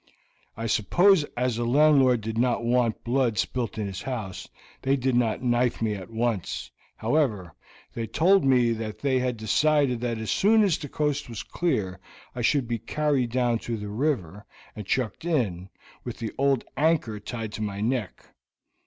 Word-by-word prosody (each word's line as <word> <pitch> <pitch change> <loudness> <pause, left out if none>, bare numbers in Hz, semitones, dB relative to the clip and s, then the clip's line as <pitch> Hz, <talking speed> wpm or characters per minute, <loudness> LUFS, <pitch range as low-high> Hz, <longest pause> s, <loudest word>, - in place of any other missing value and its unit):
"I 115 - -4
suppose, 165 - +4
as 125 -2 0
the 120 - -1
landlord 135 -1 +4
did 110 +1 -4
not 120 0 +1
want 120 -2 +1
blood 120 -2 +1
spilt 120 +4 -2
in 105 - -2
his 95 -1 -5
house, 110 -8 -5 0.3
they 135 +1 +2
did 130 -1 0
not 120 0 +1
knife 120 0 +1
me 110 -2 0
at 95 -1 -7
once; 115 -4 -2 0.3
however, 110 - 0 0.4
they 115 -1 -4
told 185 - +3
me 125 -3 +4
that 110 -2 -5
they 135 -2 +2
had 125 -2 -1
decided 130 +3 +2
that 120 -2 -1
as 110 -2 -3
soon 220 +2 +4
as 190 -6 +2
the 145 -4 -7
coast 145 -2 -1
was 115 -3 -6
clear 110 - -2 0.3
I 125 - -5
should 130 +1 +2
be 115 -1 -2
carried 140 -1 0
down 120 -1 +1
to 115 0 -4
the 105 -1 -6
river, 105 - -2 0.3
and 105 -3 -8
chucked 125 -1 -1
in, 105 - -1 0.3
with 120 - -7
an 110 - -3
old 135 -2 +2
anchor 145 -8 +1
tied 110 0 -6
to 110 - -6
my 100 -2 -3
neck. 115 -2 -2
120 Hz, 175 wpm, -26 LUFS, 110-135 Hz, 0.4 s, suppose